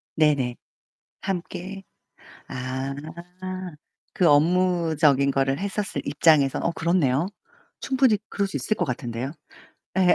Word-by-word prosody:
네네. 140 -6 +2 0.7
함께 190 +1 -5 0.6
아. 130 +1 -3 1.2
그 180 - +3
업무적인 155 -3 +3
거를 135 +1 +1
했었을 200 +1 -2
입장에서. 145 -1 +4
어 - - +1
그렇네요. 165 -2 +1 0.5
충분히 265 -5 +3
그럴 200 -1 0
수 - - -4
있을 215 - -1
것 175 - 0
같은데요. 125 0 -4 0.7
예. 180 -1 +5
160 Hz, 225 characters per minute, -25 LUFS, 135-185 Hz, 1.2 s, 예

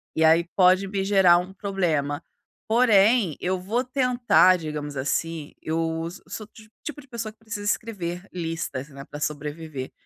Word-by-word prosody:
E 160 - +2
aí 165 +2 +5
pode 185 +1 +5
me 195 0 -2
gerar 190 -3 +5 0.2
problema. 165 -7 -1 0.4
Porém, 220 - +4
eu 185 0 -1
vou 225 +7 -1
tentar, 250 -7 +4
digamos 150 -3 -5
assim, 150 +3 -2
eu 165 0 -1 0.2
sou 215 - -6
do 215 - -26 0.3
tipo 300 -1 -6
de 280 - -19
pessoa 230 -4 -5
que - - -44
precisa 220 -2 -6
escrever 195 -4 -2
listas, 165 -5 -4
né, 140 -1 -10
pra 145 - -9
sobreviver. 150 -2 -4
180 Hz, 150 wpm, -25 LUFS, 160-210 Hz, 0.4 s, aí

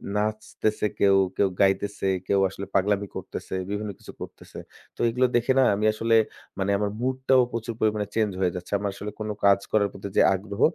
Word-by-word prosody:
নাচতেছে 110 0 -1
কেউ, 100 -1 +5 0.2
কেউ 100 - +4
গাইতেছে, 100 +1 +1 0.2
কেউ 100 - +3
আসলে 100 +1 -7
পাগলামি 100 +1 +2
করতেছে, - - -6
বিভিন্ন 105 +1 -3
কিছু - - -11
করতেছে। - - -9 0.4
তো - - -28
এগুলো 125 +2 +2
দেখে 120 +2 +2
না - - +6
আমি 105 +2 -1
আসলে 115 +1 +1 0.4
মানে 95 +1 0
আমার 105 0 -1
mood 130 +1 0
টাও 130 -1 +6
প্রচুর 115 0 -4
পরিমাণে 105 -2 +1
change 105 -3 +1
হয়ে 90 -2 +2
যাচ্ছে। 90 +2 -7
আমরা 100 0 -2
আসলে 105 +1 -6
কোনো 105 -1 -3
কাজ 100 -1 +6
করার 100 -2 +2
প্রতি 95 - -7
যে - - +7
আগ্রহ 100 +2 -6
105 Hz, 190 wpm, -25 LUFS, 100-110 Hz, 0.4 s, যে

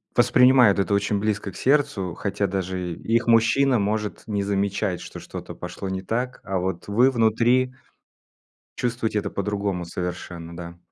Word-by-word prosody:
воспринимают 125 -5 +5
это 100 +1 +1
очень 100 0 +1
близко 105 -1 -2
к - - -17
сердцу, 135 - +1
хотя 100 0 -1
даже 95 -2 -3
их 115 +7 0
мужчина 120 +3 +4
может 105 +1 -2
не 100 -2 -1
замечать, 100 -2 -1
что - - -9
что-то - - -8
пошло 95 - -6
не 95 0 -3
так, 120 +6 -3
а 95 0 -2
вот 90 0 -3
вы 120 +6 +4
внутри 120 +2 +2 1.0
чувствуете 115 -3 -1
это 100 -1 -5
по-другому 100 -2 -2
совершенно, 85 -1 -6
да. 85 0 -8
100 Hz, 150 wpm, -24 LUFS, 95-115 Hz, 1.0 s, воспринимают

